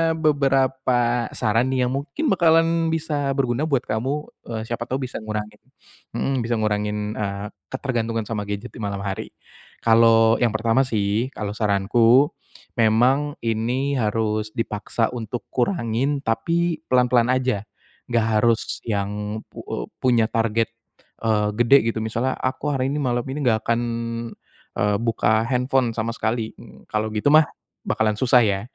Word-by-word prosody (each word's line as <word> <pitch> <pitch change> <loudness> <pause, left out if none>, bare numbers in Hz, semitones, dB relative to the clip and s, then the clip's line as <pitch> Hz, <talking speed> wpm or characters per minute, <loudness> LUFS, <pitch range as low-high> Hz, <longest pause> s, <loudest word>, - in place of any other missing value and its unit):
beberapa 135 -5 +1
saran 115 +4 +1
nih 130 -1 +1
yang - - -2
mungkin 150 - -2
bakalan 165 -2 +3
bisa 150 -4 -1
berguna 135 +2 0
buat 135 -5 +1
kamu, 110 +6 -1 0.3
eee, 115 -2 -4
siapa 120 +1 -4
tahu 130 +1 -2
bisa - - -6
ngurangin 105 -1 -5 0.6
mhm, 135 - 0
bisa 120 0 0
ngurangin, 105 -1 -1
eee, 100 0 -3 0.2
ketergantungan 115 -4 -2
sama 105 -3 -3
gadget 105 +3 -5
di - - -12
malam 100 -2 -3
hari. 95 -1 -4 0.6
Kalau, 115 0 +5
yang 120 -3 +2
pertama 115 +4 +2
sih 110 +1 0
kalau 105 -1 -3
saranku 115 +6 +3 0.5
memang 125 +7 +3
ini 120 +5 0
harus 110 -1 -1
dipaksa 115 0 -1
untuk 120 -1 -5
kurangin, 130 - 0
tapi 170 +8 0
pelan-pelan 125 -2 +3
aja. 125 -6 0 0.4
Enggak 115 -2 +1
harus 115 0 +1
yang, 105 0 -2
pu - - -10
eee, - - -4
punya 120 -3 +2
target, 115 0 0 0.6
eee, 105 -2 +2
gede 120 +4 +6
gitu. 115 - -3
Misalnya 120 +4 -1
"Aku 130 +3 -2
hari 135 -3 0
ini 150 - -1
malam 120 -3 0
ini 140 +3 -4
enggak 110 -4 +2
akan, 115 0 +2 1.0
eee, 105 0 +2
buka 110 -1 +2
handphone 125 -1 +1
sama 115 +1 -1
sekali." 110 0 -2 0.4
Kalau, 110 +1 -1
gitu 105 +5 -1
mah 155 -1 +7 0.4
bakalan 110 -1 +1
susah 125 +1 +5
ya. 100 -2 0
115 Hz, 145 wpm, -23 LUFS, 110-130 Hz, 1.0 s, mah